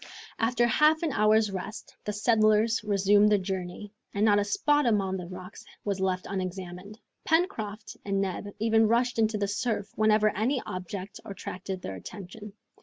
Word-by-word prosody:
After 240 +1 +2
half 305 +7 +3
an 320 - 0
hour's 215 -2 +3
rest, 195 +3 -7
the 210 - -1
settlers 215 +1 +3
resumed 205 0 +4
their 210 - +4
journey, 190 +1 -5 0.2
and 205 +2 +2
not 205 -1 +5
a - - +2
spot 290 +7 +2
among 195 -4 +1
the 180 -2 -7
rocks 185 +2 -10 0.2
was 200 -2 -1
left 185 -1 -1
unexamined. 185 +1 -5 0.3
Pencroft 235 - -1
and 195 -1 -1
Neb 195 +1 -2
even 225 0 +3
rushed 235 +1 +1
into 220 -1 +2
the 200 -1 -1
surf 205 0 -2
whenever 215 -1 +3
any 250 +6 +1
object 185 +1 -6
attracted 190 -1 -6
their 95 - -4
attention. 200 - -9
210 Hz, 160 wpm, -28 LUFS, 190-220 Hz, 0.3 s, not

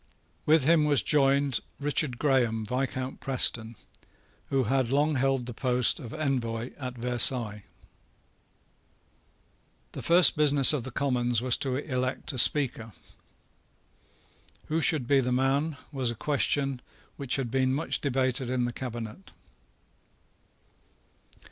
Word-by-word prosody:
With 155 -1 +4
him 155 +1 +3
was 145 -2 +3
joined 140 -2 +2 0.2
Richard 145 -3 0
Graham, 120 -6 +1
Viscount 130 +2 -3
Preston, 120 -3 0 0.7
who 135 -1 +1
had 130 +1 0
long 145 +3 +1
held 135 -2 0
the 120 - -7
post 125 +3 +1
of 120 -7 -9
Envoy 125 -6 -3
at 125 -2 -6
Versailles. 120 -3 0 2.3
The - - -7
first 175 +1 +5
business 145 -2 +5
of 135 -5 -2
the - - -5
Commons 125 -3 0
was 125 -1 +4
to 130 -2 -3
elect 130 -1 -3
a 130 - -1
Speaker. 120 -5 +2 1.8
Who 160 +2 0
should 155 -5 +1
be 140 +2 +3
the 125 -1 -1
man, 140 +4 0
was 130 -4 -1
a 120 - -3
question 140 0 -1 0.3
which 140 -3 -2
had 130 -4 -3
been 130 0 +1
much 145 +5 -2
debated 130 -2 -1
in 125 -1 0
the 120 - -4
cabinet. 115 -6 -7
130 Hz, 125 wpm, -27 LUFS, 120-140 Hz, 2.3 s, first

